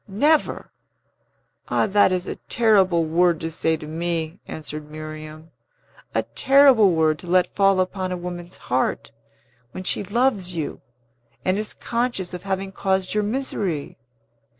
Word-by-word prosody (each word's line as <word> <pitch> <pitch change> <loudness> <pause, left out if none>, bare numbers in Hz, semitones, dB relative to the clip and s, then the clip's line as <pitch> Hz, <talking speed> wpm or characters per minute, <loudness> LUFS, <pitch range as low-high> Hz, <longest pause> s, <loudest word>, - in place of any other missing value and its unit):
"Never? 290 +11 +1 1.0
Ah, - - +1
that 205 -2 +4
is 180 -1 -1
a - - -4
terrible 190 -7 +3
word 170 +1 +2
to 165 0 -3
say 160 0 0
to 155 - -9
me!" 165 +1 -3
answered 150 -1 -7
Miriam. 155 +1 -9 0.6
"A - - +2
terrible 265 -8 +5
word 155 -1 +2
to 180 - -10
let 180 0 +2
fall 195 -1 +4
upon 185 0 -1
a 180 - -2
woman's 175 0 -7
heart, 125 +1 -1 0.6
when 185 - -6
she 190 - 0
loves 205 -4 0
you, 160 -3 -4 0.6
and 185 - +2
is 215 - -5
conscious 235 -7 -2
of 180 - -5
having 195 0 -3
caused 190 -1 -1
your 210 - +2
misery! 205 - -3
185 Hz, 145 wpm, -23 LUFS, 160-205 Hz, 1.0 s, terrible